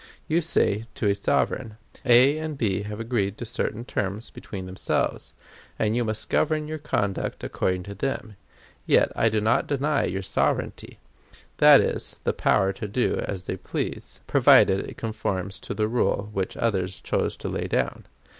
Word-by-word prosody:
You 165 +2 +2
say 115 -9 +1
to 105 - 0
a 100 - +4
sovereign: 105 +2 -1 0.3
"A 130 +5 +6
and 155 -2 -4
B 100 -6 0
have 105 +1 -6
agreed 110 -4 -1
on 120 - -4
certain 115 0 -3
terms 105 0 -3
between 95 -3 -7
themselves, 95 +1 -2 0.4
and 110 +1 +1
you 120 - +1
must 110 -1 -2
govern 155 -1 +1
your 155 0 -4
conduct 100 -9 -2
according 90 -1 -1
to 100 - -7
them; 110 -1 -3 0.5
yet - - +4
I 115 - +3
do 110 0 +1
not 110 +2 +2
deny 145 +1 +1
your 95 +2 -3
sovereignty!" - - -1 0.6
That - - +8
is, - - -3
the - - +1
power 95 0 +2
to 105 +2 -5
do 120 +5 0
as 95 -2 -5
they - - -3
please, - - -5
provided 95 0 +5
it - - -11
conforms 100 -4 -3
to - - -6
the 105 +1 +1
rule 110 -3 0
which 95 -2 -2
others 95 -5 -1
chose - - -1
to - - -5
lay - - -2
down! - - -1
110 Hz, 170 wpm, -25 LUFS, 100-125 Hz, 0.6 s, That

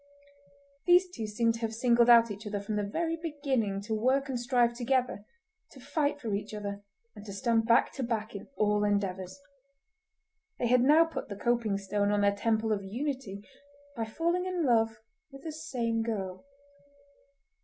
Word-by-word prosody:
These 360 +1 +5
two 225 -10 -5
seemed 230 +2 +1
to 230 - -7
have 225 -1 -3
singled 235 0 +3
out 230 -2 +7
each 205 +2 -7
other 205 -1 -2
from 205 +2 -4
the 210 - 0
very 330 +11 -1
beginning 275 - -2
to 215 +2 -4
work 260 +5 +1
and 255 -2 -2
strive 240 -1 +2
together, 245 -3 -1 0.5
to 270 - -13
fight 290 +2 -1
for 225 -6 -4
each 205 +1 -4
other 200 -1 -5 0.3
and 205 - -10
to 205 - -8
stand 225 +2 +1
back 235 +1 +4
to 270 - -5
back 225 -2 -2
in 200 - -8
all 210 0 +2
endeavours. 190 -1 -1 1.2
They - - -1
had 250 0 +5
now 300 +6 +6
put 325 - -6
the 200 - -5
coping 230 -1 0
stone 200 +1 -1
on 205 0 +2
their 200 0 +3
Temple 220 +1 0
of 200 -2 0
Unity 220 -2 -5 0.5
by 225 -2 -2
falling 340 +10 -1
in 365 -2 -1
love 225 -3 +2 0.3
with 275 -1 -13
the 320 - -5
same 240 -7 -2
girl. 200 0 -4
230 Hz, 175 wpm, -29 LUFS, 205-265 Hz, 1.2 s, out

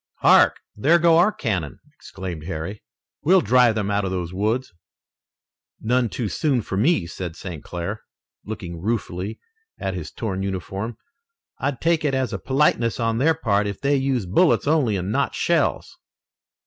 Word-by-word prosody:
"Hark! - - +6 0.2
there 150 +11 +4
go 170 -1 +5
our 190 +5 +5
cannon!" 100 - -3
exclaimed 90 -5 -8
Harry. 90 +4 -5 0.4
"We'll 185 +4 +5
drive 125 -4 +4
them 105 -2 -1
out 100 0 +1
of 95 - -1
those 90 -2 -3
woods." 110 +5 -1 1.1
"None 120 +1 +1
too 115 0 -3
soon 125 - 0
for 95 - -4
me," 110 - +2
said 85 -1 -6
St. 85 -4 -7
Clair, 90 +5 -5 0.4
looking 90 -6 -7
ruefully 100 -1 -3 0.4
at 95 - -3
his 85 -4 -5
torn 95 -4 -3
uniform. 95 +4 -4 0.6
"I'd 135 -2 -2
take 165 -1 +2
it 140 -3 +1
as 130 -3 -1
a 100 - -3
politeness 130 -4 +1
on 115 0 0
their 160 +4 +3
part 105 -9 +1
if 100 - -5
they 140 +1 +2
used 130 -9 -1
bullets 175 +5 +4
only 145 -8 +2
and 95 +2 -3
not - - 0
shells." - - 0
110 Hz, 160 wpm, -23 LUFS, 95-135 Hz, 1.1 s, Hark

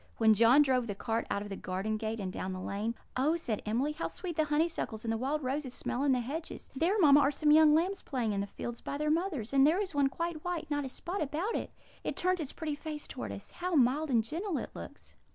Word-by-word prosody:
When 220 -1 +6
John 235 +7 +6
drove 255 -3 +1
the 205 - -3
cart 225 +2 -2
out 200 - -1
of 205 - -8
the 195 - -4
garden 195 +4 -2
gate 220 +1 -3
and 185 -2 -4
down 185 0 -3
the 185 - -5
lane, 210 +5 -3 0.2
"Oh," 285 +6 +2
said 240 -11 -2
Emily, 250 +8 +1
"how 310 +2 -3
sweet 355 -2 -5
the 310 - +2
honeysuckles 295 -7 -1
and 225 - 0
the 225 - 0
wild 285 +4 -1
roses 260 0 -2
smell 245 - -3
in 285 - +3
the 250 -1 +2
hedges! 310 +7 -6
There, 345 +9 +2
mamma, 290 -7 +7
are 280 -1 +4
some 295 +1 +2
young 305 0 +7
lambs 370 +5 +1
playing 235 -6 -1
in 200 - 0
the 200 - -3
fields 240 +3 -6
by 280 - -4
their 300 +1 +1
mothers; 310 - -1
and 275 +1 +6
there 335 +5 +3
is 390 -5 -2
one 285 -1 +3
quite 335 +1 -4
white 350 -4 -3
not 290 -1 0
a - - -4
spot 355 +9 -4
about 310 +10 -1
it. - - -2 0.3
It - - -2
turns 365 0 +1
its 295 -4 -3
pretty 315 -2 -4
face 300 0 -6
towards - - -5
us. - - -11
How 360 0 -2
mild 285 +3 +3
and 235 -4 +3
gentle 335 - -3
it - - -5
looks!" - - -10
285 Hz, 260 wpm, -31 LUFS, 230-320 Hz, 0.3 s, mamma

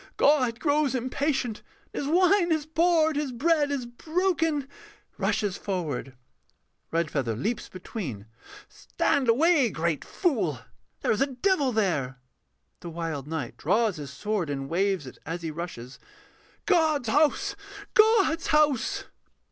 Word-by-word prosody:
God 255 -5 +3
grows 285 -1 +1
impatient, 255 -2 -1 0.3
and - - -3
His - - -3
wine 365 0 +4
is 315 -2 +1
poured, 320 -1 +2
His 295 -3 -1
bread 295 +4 +2
is 275 -4 -2
broken. 320 +2 -1 0.5
[Rushes 200 -3 0
forward.] 155 -9 -4 0.7
REDFEATHER 150 -8 -1
[leaps 215 - -3
between]. 170 - -6 0.4
Stand 270 -4 -1
away, 285 +1 +4
great 165 -4 -1
fool, 215 - 0 0.4
There - - +1
is 215 - 0
a 275 - +4
devil 280 +1 +1
there! 165 - 0 0.6
THE 170 - -8
WILD 165 -4 -4
KNIGHT 155 -6 -4
[draws 210 +3 +1
his 145 -2 -7
sword, 190 +4 -2
and 135 -1 -3
waves 185 0 0
it 130 - -11
as 170 +2 -5
he 160 - -3
rushes]. 150 -7 -7 0.7
God's 315 - +2
house! 310 - +2 0.4
God's 430 -7 +4
house! 305 - +2
240 Hz, 130 wpm, -27 LUFS, -, 0.7 s, wine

